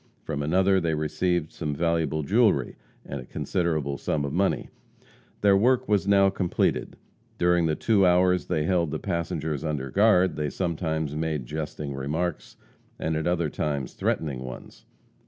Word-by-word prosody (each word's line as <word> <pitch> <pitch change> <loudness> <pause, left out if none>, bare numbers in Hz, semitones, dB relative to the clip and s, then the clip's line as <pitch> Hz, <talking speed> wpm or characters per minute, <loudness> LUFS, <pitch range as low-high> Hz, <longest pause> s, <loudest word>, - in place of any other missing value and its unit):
From 75 - -3
another 95 +5 +3
they 85 -3 0
received 80 +2 -1
some 75 -3 -4
valuable 80 -1 0
jewelry, 100 - +2 0.3
and 70 -1 -5
a - - -11
considerable 80 -6 -1
sum 70 -2 -1
of 70 - -4
money. 95 +2 0 0.7
Their 100 -1 +5
work 125 +5 +3
was 100 -2 +1
now 100 -1 +5
completed. 90 -2 -1 0.4
During 85 -1 +3
the 80 - +1
two 105 +1 +2
hours 90 0 +3
they 75 - 0
held 85 -1 +1
the - - -2
passengers 80 -4 -3
under 70 -4 -3
guard, 95 -5 +4
they 75 -1 -1
sometimes 80 -3 -2
made 75 -4 -2
jesting 75 0 -5
remarks, 75 0 -3 0.4
and 80 0 -2
at 80 +2 -1
other 85 -4 0
times 70 -3 -2
threatening 70 -6 -1
ones. 65 0 -10
80 Hz, 155 wpm, -26 LUFS, 75-90 Hz, 0.7 s, Their